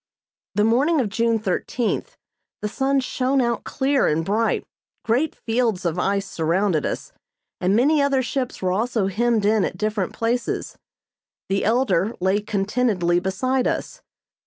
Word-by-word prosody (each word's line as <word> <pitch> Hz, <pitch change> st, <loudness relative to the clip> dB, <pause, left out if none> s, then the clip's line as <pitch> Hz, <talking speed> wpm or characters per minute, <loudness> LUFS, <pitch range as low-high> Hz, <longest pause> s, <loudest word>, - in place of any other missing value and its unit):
The 210 Hz, -, +3 dB
morning 275 Hz, +9 st, +3 dB
of 235 Hz, -6 st, 0 dB
June 230 Hz, +2 st, +1 dB
thirteenth 220 Hz, +3 st, -2 dB, 0.5 s
the -, -, +1 dB
sun 270 Hz, +5 st, +1 dB
shone 260 Hz, +1 st, 0 dB
out 235 Hz, -2 st, 0 dB
clear 275 Hz, 0 st, +1 dB
and 160 Hz, +2 st, 0 dB
bright. 220 Hz, +4 st, 0 dB, 0.4 s
Great 255 Hz, +8 st, +1 dB
fields 225 Hz, -5 st, -1 dB
of 170 Hz, +1 st, 0 dB
ice 195 Hz, +2 st, 0 dB
surrounded 170 Hz, -1 st, 0 dB
us, -, -, -5 dB, 0.5 s
and 185 Hz, +2 st, +2 dB
many 285 Hz, +6 st, +4 dB
other 275 Hz, -2 st, +2 dB
ships 255 Hz, -4 st, -3 dB
were 185 Hz, -, +1 dB
also 220 Hz, +1 st, 0 dB
hemmed 220 Hz, +2 st, +1 dB
in 215 Hz, -1 st, +3 dB
at -, -, -3 dB
different 210 Hz, -3 st, -1 dB
places. 235 Hz, +1 st, -2 dB, 0.7 s
The 195 Hz, 0 st, +1 dB
"Elder" 230 Hz, -3 st, +1 dB
lay 190 Hz, +3 st, +1 dB
contentedly 200 Hz, -4 st, +1 dB
beside 250 Hz, +8 st, 0 dB
us. -, -, -3 dB
225 Hz, 145 wpm, -22 LUFS, 195-250 Hz, 0.7 s, many